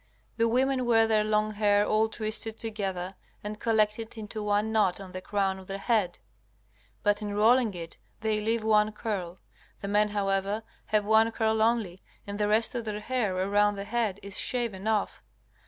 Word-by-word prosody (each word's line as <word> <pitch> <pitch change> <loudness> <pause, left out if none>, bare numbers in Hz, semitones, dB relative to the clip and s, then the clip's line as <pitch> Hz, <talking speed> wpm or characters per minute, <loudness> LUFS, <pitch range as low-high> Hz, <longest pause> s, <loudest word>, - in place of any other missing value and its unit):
The 230 0 +3
women 255 +1 +1
wear 225 -1 +5
their 215 -1 +2
long 215 0 +1
hair 205 -1 +3
all 215 +1 +2
twisted 220 0 -1
together 195 -5 -3 0.3
and 210 +1 -5
collected 220 0 0
into 215 0 -5
one 210 +1 0
knot 210 -5 +2
on 190 -2 -9
the 185 - -6
crown 195 -1 -1
of 190 - -13
the 195 - -4
head, 200 -4 0 0.9
but 205 0 +2
in 205 -1 -4
rolling 225 0 +4
it 165 -1 -8 0.2
they 215 -1 0
leave 225 +1 0
one 215 -1 +3
curl. 195 -5 -4 0.4
The 200 - -4
men, 210 +1 +2
however, 200 +1 -1 0.2
have 210 -1 +1
one 220 +1 +4
curl 220 -1 0
only 220 -5 +1 0.2
and 205 +1 -6
the 210 - +2
rest 220 +2 +2
of 235 -2 -4
their 210 -1 -3
hair 215 -4 -1
around 205 +2 +2
the 200 - -5
head 215 -2 -1
is 200 -1 -2
shaven 225 -5 -1
off. 215 -2 0
210 Hz, 180 wpm, -28 LUFS, 200-220 Hz, 0.9 s, wear